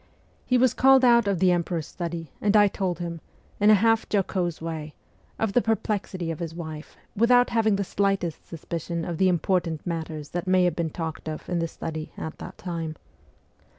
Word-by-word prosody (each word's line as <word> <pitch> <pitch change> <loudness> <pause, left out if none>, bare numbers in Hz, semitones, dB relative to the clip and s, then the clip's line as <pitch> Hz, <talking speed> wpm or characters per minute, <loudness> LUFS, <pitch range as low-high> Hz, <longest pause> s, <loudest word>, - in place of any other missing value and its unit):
He 250 - +3
was 250 -1 +4
called 265 0 +6
out 235 -3 +5
of 200 -2 +1
the 185 +1 +4
emperor's 170 -2 -1
study, 170 -4 -5
and 210 +1 +4
I 205 0 +7
told 190 -3 -2
him, 170 -2 -5 0.4
in 205 +1 +5
a 215 - +8
half 225 +2 +3
jocose 185 -4 0
way, 160 -2 -5 0.4
of 220 -3 -1
the 245 - +4
perplexity 200 -6 -1
of 165 - -6
his 165 -2 -5
wife, 155 -2 -8 0.2
without 245 +3 +4
having 220 -3 +3
the 200 - 0
slightest 195 -4 -1
suspicion 170 0 -4
of 170 -2 -4
the 190 -1 +4
important 170 -2 0
matters 160 -3 -4
that 175 +1 -4
may 185 0 +4
have 175 -3 +2
been 170 -2 -1
talked 160 0 -5
of 155 - -6
in 175 -1 -1
the 165 - 0
study 155 -1 -6
at 160 - -6
that - - -9
time. 165 -3 -4
175 Hz, 190 wpm, -25 LUFS, 165-205 Hz, 0.4 s, a